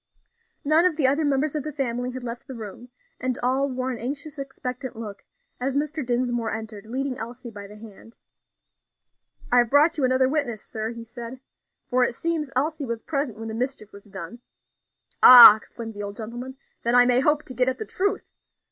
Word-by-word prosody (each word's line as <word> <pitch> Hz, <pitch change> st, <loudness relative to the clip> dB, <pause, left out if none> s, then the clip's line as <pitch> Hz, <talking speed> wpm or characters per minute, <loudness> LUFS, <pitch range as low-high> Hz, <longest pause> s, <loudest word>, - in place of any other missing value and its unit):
None 310 Hz, +3 st, +5 dB
of 360 Hz, -3 st, +2 dB
the 295 Hz, -, +2 dB
other 280 Hz, +4 st, +3 dB
members 285 Hz, 0 st, 0 dB
of 305 Hz, -, -2 dB
the 305 Hz, +2 st, -6 dB
family 250 Hz, -3 st, -3 dB
had 255 Hz, 0 st, -7 dB
left 240 Hz, +2 st, -7 dB
the 265 Hz, -, -8 dB
room, 225 Hz, +2 st, -9 dB, 0.3 s
and 255 Hz, -1 st, -2 dB
all 265 Hz, +3 st, +1 dB
wore 255 Hz, 0 st, -3 dB
an 240 Hz, -, -6 dB
anxious, 285 Hz, +4 st, -6 dB
expectant 260 Hz, -2 st, -6 dB
look, 210 Hz, -3 st, -8 dB, 0.4 s
as 260 Hz, +2 st, -2 dB
Mr. 300 Hz, +1 st, -2 dB
Dinsmore 240 Hz, -1 st, -1 dB
entered, 220 Hz, -1 st, -7 dB
leading 260 Hz, +2 st, -3 dB
Elsie 240 Hz, +1 st, -8 dB
by 205 Hz, -2 st, -10 dB
the 210 Hz, -, -13 dB
hand. 220 Hz, +1 st, -14 dB, 1.3 s
"I 245 Hz, -, +5 dB
have 240 Hz, -2 st, +2 dB
brought 305 Hz, +4 st, +4 dB
you -, -, 0 dB
another 260 Hz, 0 st, +3 dB
witness, 265 Hz, -6 st, -2 dB
sir," 220 Hz, 0 st, -5 dB
he 230 Hz, 0 st, -8 dB
said, 235 Hz, +2 st, -9 dB, 0.5 s
"for 250 Hz, 0 st, +2 dB
it 240 Hz, -, -1 dB
seems 325 Hz, -2 st, -2 dB
Elsie 300 Hz, +3 st, -1 dB
was 235 Hz, -3 st, -5 dB
present 275 Hz, -7 st, -3 dB
when 225 Hz, 0 st, -7 dB
the 220 Hz, -, -5 dB
mischief 245 Hz, -2 st, -4 dB
was 200 Hz, 0 st, -14 dB
done." 195 Hz, +2 st, -9 dB, 0.8 s
"Ah!" 245 Hz, -4 st, +12 dB
exclaimed 225 Hz, +1 st, -10 dB
the 205 Hz, -, -7 dB
old 200 Hz, 0 st, -6 dB
gentlemen; 240 Hz, +4 st, -7 dB, 0.2 s
"then 235 Hz, +1 st, +1 dB
I 245 Hz, 0 st, +7 dB
may 245 Hz, 0 st, +4 dB
hope 295 Hz, +2 st, +2 dB
to 255 Hz, -, -9 dB
get 250 Hz, +1 st, +1 dB
at 260 Hz, -, -3 dB
the 435 Hz, -, -5 dB
truth. 400 Hz, 0 st, -3 dB
250 Hz, 200 wpm, -24 LUFS, 230-275 Hz, 1.3 s, Ah